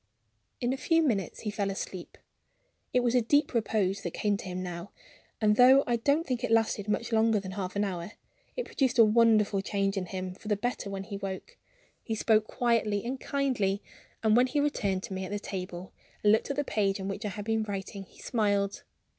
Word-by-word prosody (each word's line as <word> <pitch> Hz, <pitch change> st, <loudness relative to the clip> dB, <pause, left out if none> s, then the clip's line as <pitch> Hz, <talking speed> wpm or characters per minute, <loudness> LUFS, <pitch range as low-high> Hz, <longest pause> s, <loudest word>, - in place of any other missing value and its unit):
In 245 Hz, +1 st, 0 dB
a -, -, -3 dB
few 330 Hz, +3 st, +2 dB
minutes 205 Hz, -, -1 dB
he 210 Hz, -, -3 dB
fell 205 Hz, -1 st, -1 dB
asleep. 190 Hz, -2 st, -6 dB, 0.7 s
It 250 Hz, -, +3 dB
was 240 Hz, -1 st, +1 dB
a 250 Hz, -, +4 dB
deep 290 Hz, +6 st, +2 dB
repose 205 Hz, -4 st, 0 dB
that 175 Hz, -, -5 dB
came 205 Hz, -1 st, +1 dB
to -, -, -9 dB
him 185 Hz, 0 st, -4 dB
now; 175 Hz, +1 st, -6 dB, 0.5 s
and, 210 Hz, -1 st, +3 dB
though 260 Hz, +2 st, +7 dB
I 240 Hz, -1 st, +1 dB
don't 285 Hz, +7 st, +1 dB
think 250 Hz, -2 st, -2 dB
it -, -, 0 dB
lasted 225 Hz, -2 st, +2 dB
much 225 Hz, +3 st, -1 dB
longer 225 Hz, -1 st, +3 dB
than 190 Hz, -1 st, -7 dB
half 190 Hz, -1 st, -4 dB
an 205 Hz, -, +1 dB
hour, 185 Hz, 0 st, -4 dB, 0.4 s
it -, -, -2 dB
produced 265 Hz, -2 st, 0 dB
a 230 Hz, -, +8 dB
wonderful 215 Hz, -2 st, +4 dB
change 195 Hz, 0 st, -1 dB
in 185 Hz, -1 st, -2 dB
him 185 Hz, 0 st, -4 dB
for 205 Hz, -, -13 dB
the 210 Hz, -, +2 dB
better 225 Hz, -1 st, -3 dB
when 195 Hz, -1 st, -4 dB
he 200 Hz, 0 st, -6 dB
woke. 195 Hz, -, -6 dB, 0.5 s
He 225 Hz, -, -3 dB
spoke 215 Hz, 0 st, +3 dB
quietly 230 Hz, -4 st, +1 dB
and 260 Hz, +2 st, -3 dB
kindly; 235 Hz, -8 st, 0 dB, 0.4 s
and 220 Hz, -1 st, +4 dB
when 250 Hz, +2 st, +5 dB
he 290 Hz, +3 st, 0 dB
returned 200 Hz, -10 st, 0 dB
to -, -, -6 dB
me 190 Hz, 0 st, -3 dB
at 185 Hz, -, -5 dB
the 205 Hz, -, -1 dB
table 185 Hz, -2 st, -6 dB, 0.3 s
and 210 Hz, -, +6 dB
looked 220 Hz, -, +2 dB
at 280 Hz, -, -1 dB
the 290 Hz, -, 0 dB
page 200 Hz, -6 st, 0 dB
on 190 Hz, -, -4 dB
which 200 Hz, +2 st, -4 dB
I 210 Hz, -, -2 dB
had 205 Hz, +1 st, -6 dB
been 225 Hz, 0 st, +1 dB
writing, 200 Hz, -1 st, -5 dB
he -, -, -22 dB
smiled. 205 Hz, -3 st, 0 dB
210 Hz, 220 wpm, -29 LUFS, 195-235 Hz, 0.7 s, a